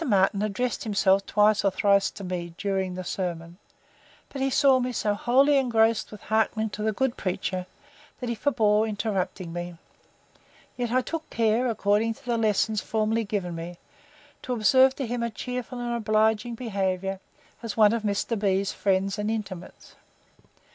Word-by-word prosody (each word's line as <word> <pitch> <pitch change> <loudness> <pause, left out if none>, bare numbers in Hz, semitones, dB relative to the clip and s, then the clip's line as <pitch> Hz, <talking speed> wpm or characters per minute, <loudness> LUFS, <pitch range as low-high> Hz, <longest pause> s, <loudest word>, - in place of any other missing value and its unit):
Martin 200 -5 +2
addressed 215 +4 -2
himself 200 -3 +2
twice 210 0 +3
or 200 - +4
thrice 200 +1 +2
to 200 - -10
me, 175 -2 -5
during 190 -2 -2
the 185 - -5
sermon; 175 -1 -4 0.7
but 275 - -6
he 270 - +2
saw 270 -1 +4
me 250 0 -1
so 210 -3 0
wholly 270 +7 +3
engrossed 230 -3 +2
with 210 -1 -10
hearkening 220 0 0
to 210 - -6
the 220 +1 +1
good 255 +3 -1
preacher, 185 -1 -3 0.5
that 250 - -4
he 235 - -1
forbore 220 -4 +2
interrupting 195 -4 -3
me; 175 0 -6 1.0
yet 245 -2 -2
I 255 +1 +3
took 325 +4 -5
care, 230 +2 +1
according 220 0 +1
to 280 - -20
the 240 -1 0
lessons 215 0 +1
formerly 220 +1 0
given 195 -4 -3
me, 170 +1 -7 0.6
to 250 - -3
observe 260 +4 +4
to 275 - -3
him 240 +1 -3
a 235 - -1
cheerful 250 +3 -5
and 240 0 -2
obliging 220 +1 +1
behaviour, 195 -4 -2 0.4
as 230 -2 -5
one 215 -1 +6
of 230 - -1
Mr. 210 +2 -1
B——'s 195 -1 +1
friends 195 +1 0
and 210 +1 -1
intimates. 195 -5 -6
215 Hz, 165 wpm, -26 LUFS, 195-235 Hz, 1.0 s, one